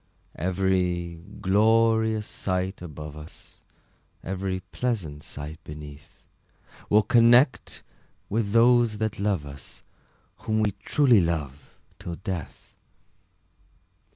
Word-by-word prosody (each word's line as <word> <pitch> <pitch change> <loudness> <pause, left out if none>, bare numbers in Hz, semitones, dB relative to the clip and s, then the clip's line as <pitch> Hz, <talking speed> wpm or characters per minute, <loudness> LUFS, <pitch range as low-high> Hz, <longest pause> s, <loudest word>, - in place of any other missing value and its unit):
Every 90 -2 0 0.2
glorious 110 +2 +3
sight 95 -1 -3
above 75 -3 -8
us, 75 +1 -12 0.6
Every 95 0 -3
pleasant 95 -13 -3
sight 75 +2 -9
beneath, 75 -1 -11 0.7
We'll 105 +1 +5
connect 120 +4 +4 0.4
with 105 -1 -1
those 115 -1 +4
that 110 -2 -2
love 100 -7 0
us, 70 -1 -10 0.5
Whom 110 0 -1
we 105 -1 +2
truly 125 -9 +4
love 75 -5 -4 0.2
till 90 -2 -6
death! 90 -2 -7
95 Hz, 95 wpm, -26 LUFS, 80-110 Hz, 0.7 s, We'll